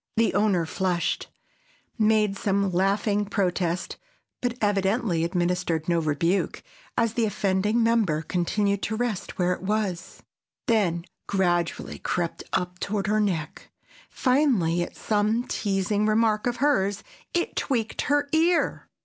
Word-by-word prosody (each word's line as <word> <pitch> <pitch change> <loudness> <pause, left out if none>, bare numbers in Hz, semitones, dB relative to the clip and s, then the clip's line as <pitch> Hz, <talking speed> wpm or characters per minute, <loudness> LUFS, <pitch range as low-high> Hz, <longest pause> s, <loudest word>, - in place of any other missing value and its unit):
The 230 0 +3
owner 200 -5 +2
flushed, 180 +1 -1 0.7
made 215 -3 +3
some 200 -1 0
laughing 200 +3 +1
protest, 180 -3 -1 0.4
but 245 -1 -1
evidently 200 -3 +1
administered 175 -2 0
no 170 -1 +2
rebuke, 165 +4 0 0.3
as 230 -2 +2
the 230 -1 +1
offending 205 +2 +1
member 215 -9 +2
continued 200 +4 0
to 220 - -2
rest 230 -4 -3
where 180 0 +2
it - - -7
was, 195 -3 -2 0.4
then 180 -7 +1 0.2
gradually 175 -3 0
crept 170 -2 -2
up 180 0 -2
toward 200 0 -2
her 215 +1 +2
neck; 170 -7 -2 0.4
finally, 250 - +2
at 175 - -4
some 215 +2 +1
teasing 205 -1 0
remark 215 0 +2
of 240 - 0
hers, 205 -8 +1 0.3
it 350 - 0
tweaked 230 -5 -1
her 290 0 +1
ear. 335 +2 +1
200 Hz, 125 wpm, -25 LUFS, 180-220 Hz, 0.7 s, The